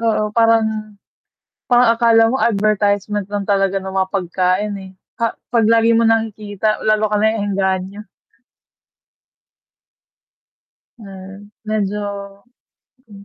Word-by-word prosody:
Oo 215 -2 0
para 230 0 +4
na, 215 -1 -5 0.7
parang 245 -1 +5
akala 230 -1 +4
mo 265 - 0
advertisement 205 -2 0
lang 205 -1 -3
talaga 195 -1 +1
ng 190 0 -6
mga 190 -1 0
pagkain, 185 +2 -1
eh, 190 - -11 0.2
pa 230 -2 -3 0.2
pag 225 -2 +3
lagi 230 0 +4
mo 230 - +3
nakikita, 215 -2 -1
lalo 215 0 +2
ka 210 - +2
naeengganyo. 200 -2 -1 2.9
Mm, 195 0 -12 0.2
medyo, 210 -1 -2 1.1
hmm, 200 -2 -14
210 Hz, 110 wpm, -18 LUFS, 195-225 Hz, 2.9 s, parang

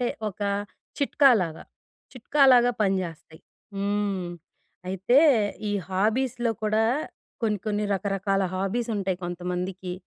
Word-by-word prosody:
అంటే 245 - +1 0.2
ఒక 200 - -12 0.6
చిట్కాలాగా, 240 - +3 0.5
చిట్కాలాగా 255 -1 +4
పనిజేస్తాయి. 175 -5 -3 0.4
హ్మ్. 200 -2 -1 0.6
అయితే 195 +8 +3 0.5
ఈ - - -1 0.2
హాబీస్‌లో 230 +5 0
కూడా 215 +1 +2 0.6
కొన్ని 210 -2 +1
కొన్ని 210 0 0
రకరకాల 195 0 -1
హాబీస్ 195 +6 -2
ఉంటాయి 190 -2 -1
కొంతమందికి. 180 +1 -4
200 Hz, 95 wpm, -26 LUFS, 185-230 Hz, 0.6 s, చిట్కాలాగా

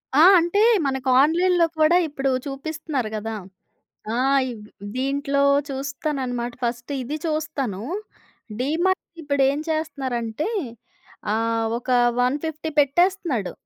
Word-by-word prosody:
ఆ! 300 - +6 0.2
అంటే, 345 +5 +1 0.2
మనకు 265 -1 -1
ఆన్‌లైన్‌లో 345 +3 +3
కూడా 310 +3 +5
ఇప్పుడు 275 -2 -2 0.2
చూపిస్తున్నారు 280 -3 -4
గదా. 220 +1 -4 0.8
ఆ! - - -1 0.3
ఇవ్ 215 -3 -9 0.3
దీంట్లో 280 +1 0 0.3
చూస్తానన్నమాట, 270 -3 -3
ఫస్ట్ 240 +3 -3
ఇది 285 +5 -4
చూస్తాను. 300 - -2 0.8
డీమార్ట్ 335 +8 +1 0.2
ఇప్పుడు 285 -2 +1
ఏం 285 - -3
చేస్తున్నారంటే 270 - -2 0.8
ఆహ్, 225 0 0
ఒక 245 - -9 0.3
150 305 +5 -1
పెట్టేస్తున్నాడు. 295 - +1
280 Hz, 100 wpm, -23 LUFS, 245-315 Hz, 0.8 s, ఆ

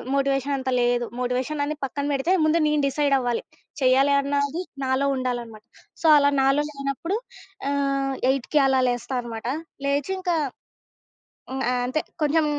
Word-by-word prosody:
Motivation 275 0 +1
అంత 260 0 -3
లేదు. 240 0 +2
Motivation 255 +4 -1
అనేది 305 0 -3
పక్కన 285 +2 -4
పెడితే, 275 +7 0
ముందు 320 +2 +3
నేను 300 -1 +2
డిసైడ్ 280 0 +2
అవ్వాలి. 245 -2 -1 0.4
చేయాలి 265 +2 +4
అన్నది 285 +4 -1 0.2
నాలో 260 +1 +1
ఉండాలన్నమాట. 240 -4 -4 0.4
సో 325 - +2
అలా 285 0 +4
నాలో 275 +2 +3
లేనప్పుడు 275 +7 -3 0.5
ఆహ్, 275 -1 0 0.2
8:00కి 275 +3 0
అలా 265 -1 +3
లేస్తా 245 +2 -2
అనమాట 230 -1 -6 0.4
లేచి 285 +5 0
ఇంక 365 -1 -4 1.2
హ్మ్. 265 0 -2
ఆహ్, 250 -1 0
అంతే. 310 +5 -1 0.2
కొంచెం 305 +1 +3
275 Hz, 145 wpm, -24 LUFS, 255-285 Hz, 1.2 s, చేయాలి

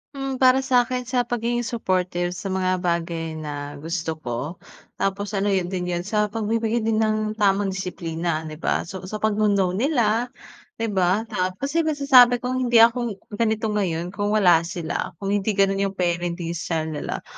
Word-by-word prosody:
Hmm, 270 -1 -3
para 255 0 +5
sa'kin 250 -1 +1
sa 250 -1 +1
pagiging 240 0 -1
supportive 180 -6 -1
sa 195 +1 -5
mga 185 -1 0
bagay 170 -2 -1
na 145 -2 -6
gusto 160 0 -3
ko, 140 +7 -5 0.4
tapos 195 +1 -1
ano 200 -1 0
yun 190 -2 0
din 180 -1 -2
yun 175 0 -2
sa 210 +1 +1
pagbibigay 225 +1 -1
din 220 0 +1
ng 215 -1 +1
tamang 195 -1 +2
disiplina, 170 -3 -3
di 155 -1 -8
ba? - - 0
So, 185 +1 -8
sa 215 +2 -6
pagno-no 205 -3 +2
nila, 235 - +1 0.5
di 225 -1 -2
ba? 190 +2 +2
Tapos 185 +8 -2
yung 325 - +1
masasabi 250 -4 +6
kong 255 +1 -1
hindi 240 - 0
ako 235 -2 +2 0.2
ganito 220 -1 +1
ngayon 180 -4 -1
kung 205 +2 -1
wala 180 -6 +6
sila 175 0 -4
kung 195 +4 -4
hindi 205 +1 0
ganun 195 0 +2
yung 195 0 -1
parenting 175 -1 -1
style 160 -1 -2
nila. 150 - -4
195 Hz, 170 wpm, -23 LUFS, 175-225 Hz, 0.5 s, masasabi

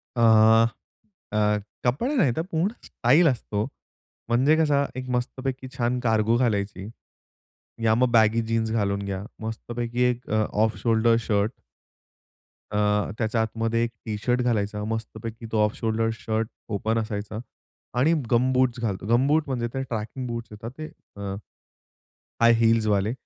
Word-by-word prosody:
अ, 120 - 0 1.1
अ, 105 - 0 0.4
कपडे 145 - 0
नाही 165 - +3
तर - - 0
पूर्ण 165 +3 +1 0.2
स्टाइल 145 +8 +3
असतो. 110 -5 -1 0.6
म्हणजे 130 +6 +4
कसं 145 -3 +3
एक 130 0 -5
मस्तपैकी 130 +1 -3
छान 120 +1 0
कार्गो 110 -1 +2
घालायची. 100 -4 -1 0.9
या 110 -1 +4
मग 125 +1 +2
बॅगी 115 0 +4
जीन्स 110 -1 0
घालून 100 -3 0
घ्या. 95 -1 -4 0.2
मस्तपैकी 120 +2 -3
एक 125 0 -4
अ, 110 0 +2 0.2
ऑफ 110 0 0
शोल्डर 115 0 +3
शर्ट. 105 +1 +1 1.2
अ, 105 -1 +1
त्याच्या 110 0 0
आतमध्ये 115 +1 0
एक 120 - 0 0.2
टी 105 -2 -3
शर्ट 125 0 +2
घालायचा, 105 -3 0
मस्तपैकी 110 +1 -5
तो 110 -1 +3
ऑफ 105 0 +1
शोल्डर 115 0 0
शर्ट 110 0 -2 0.3
ओपन 110 +3 -1
असायचा 110 -1 -3 0.6
आणि 155 +6 +4 0.2
गमबूट 130 0 +2
घालतो. 100 -4 -2
गमबूट 135 +7 +3
म्हणजे 120 -3 -1
ते 135 - -2
ट्रेकिंग 115 +1 -5
बूट 115 0 -4
येतात 110 +2 -8
ते, 155 0 -5 0.3
अ 100 -1 -4 1.1
हाय 115 0 +7
हील्स 115 -1 +3
वाले 105 +1 +1
115 Hz, 140 wpm, -25 LUFS, 110-125 Hz, 1.2 s, हाय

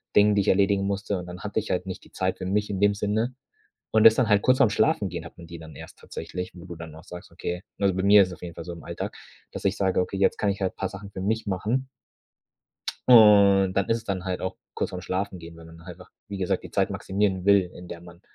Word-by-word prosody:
Dingen, 105 0 +6
die 100 - +3
ich - - -4
erledigen 100 0 +3
musste, 100 -1 -2
und 90 - -8
dann 90 +1 -9
hatte 105 +1 -1
ich 110 - -7
halt 90 - -1
nicht 95 -1 -7
die - - -19
Zeit - - -2
für - - -5
mich 105 +3 0
in 100 -2 -3
dem 100 0 +3
Sinne. 110 +5 -1 0.6
Und, 110 0 +4
das 110 - +9
dann 120 -2 +1
halt 105 -2 +4
kurz 130 0 +3
vorm 130 -6 +5
Schlafengehen 100 -6 0
hat 80 - -12
man 85 -1 -12
die 85 0 -9
dann 80 -1 -12
erst - - -12
tatsächlich, 90 0 -7
wo 90 -1 -12
du 90 -2 -9
dann 80 -1 -9
auch 80 +1 -13
sagst: 90 -1 -10
„Okay“, 90 +1 -5 0.2
also 100 -1 +2
bei 95 - -1
mir 100 +1 +7
ist 95 - 0
es 90 - -7
auf - - -19
jeden 85 -1 -7
Fall 85 - -8
so 85 - -6
im 85 -2 -11
Alltag, - - -5 0.4
dass - - -8
ich 100 +1 +1
sage, 95 -2 +1
okay: 90 +2 -3
„Jetzt 95 0 +2
kann 105 - 0
ich 100 - -4
halt 95 - -2
paar 95 - -2
Sachen 100 +1 -10
für 95 - -7
mich 110 +4 -1
machen.“ 110 +7 -1 1.2
Und, 100 -5 +7
dann 100 -1 0
ist 115 - +2
es 115 - -14
dann 95 -2 -3
halt 95 -1 -3
auch 95 - -4 0.2
kurz - - -2
vorm 90 - -6
Schlafengehen, 90 -2 -4
weil 85 - -13
man 80 0 -14
einfach, 90 +1 -12 0.2
wie 100 -2 -6
gesagt, 90 -2 -1
die - - -10
Zeit - - +1
maximieren 95 -2 -1
will, 100 -3 +4
in 90 - -11
der 85 -1 -8
man 85 0 -14
95 Hz, 270 wpm, -25 LUFS, 90-105 Hz, 1.2 s, das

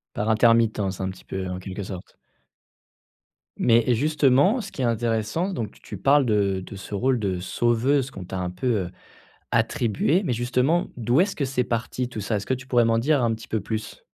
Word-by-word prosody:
Par 105 - -1
intermittence, 110 -4 +3
un 95 - -1
petit 95 - -11
peu, 95 0 -4
en 90 0 -4
quelque 95 +2 -6
sorte. 95 -1 -9 1.4
Mais 115 0 +4
et 125 - +4
justement 145 - +3
ce 210 - -6
qui 135 - -6
est - - +1
intéressant 115 - 0
donc 110 - -3
tu - - -21
tu 105 - -8
parles 140 +6 +4
de 100 -4 +1
de - - -9
ce 100 +1 -9
rôle 125 +5 +1
de 95 -4 -1
sauveuse 120 +7 +1
qu'on 95 -7 -8
t'a 95 +1 -5
un 90 -1 -2
peu, 90 +8 -4 0.2
heu, - - -11 0.6
attribué, 120 - +1
mais 130 - 0
justement, 125 +8 +1
d'où 120 +5 +2
est-ce 195 +1 +1
que 145 - 0
c'est 125 -1 0
parti 120 +2 -2
tout 115 -3 -6
ça? 105 +2 -1
Est-ce 100 - -4
que 130 - +1
tu 130 +1 -10
pourrais 120 -3 +3
m'en 115 0 +2
dire 140 +3 +2
un 115 -1 +2
petit 110 +1 -11
peu 110 - -1
plus? 110 +1 -5
115 Hz, 210 wpm, -24 LUFS, 105-130 Hz, 1.4 s, Mais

